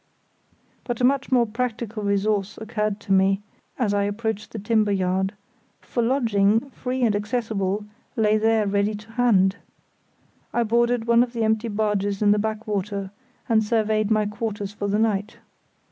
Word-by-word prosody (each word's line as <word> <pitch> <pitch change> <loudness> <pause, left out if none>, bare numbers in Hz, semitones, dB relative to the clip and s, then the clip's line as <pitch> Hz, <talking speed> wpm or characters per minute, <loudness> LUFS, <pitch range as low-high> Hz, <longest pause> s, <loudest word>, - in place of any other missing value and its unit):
But 240 -2 -4
a - - -1
much 275 +2 +2
more 245 -2 +4
practical 230 -1 -3
resource 200 0 0
occurred 215 -2 -2
to 195 - -1
me 195 +1 +3 0.3
as 220 -6 +1
I 200 0 +1
approached 215 0 -3
the - - -6
timber 215 0 +1
yard; 190 0 0 0.5
for 240 - -3
lodging, 230 -1 +2
free 255 0 -3
and 220 -3 +3
accessible, 210 -2 -1 0.3
lay 215 -2 +3
there 220 0 +2
ready 200 +1 +1
to 210 +2 -12
hand. 210 -5 +3 1.0
I 240 - +3
boarded 235 +1 +1
one 235 0 +5
of 245 0 0
the 230 -2 -1
empty 220 +1 +1
barges 205 -1 -1
in 205 - +5
the 210 - +3
backwater, 205 -2 -3 0.4
and 220 -3 +3
surveyed 215 -1 +1
my 215 -1 +2
quarters 205 -1 -4
for 205 0 -3
the 200 +1 +1
night. 215 -1 0
215 Hz, 160 wpm, -24 LUFS, 205-230 Hz, 1.0 s, one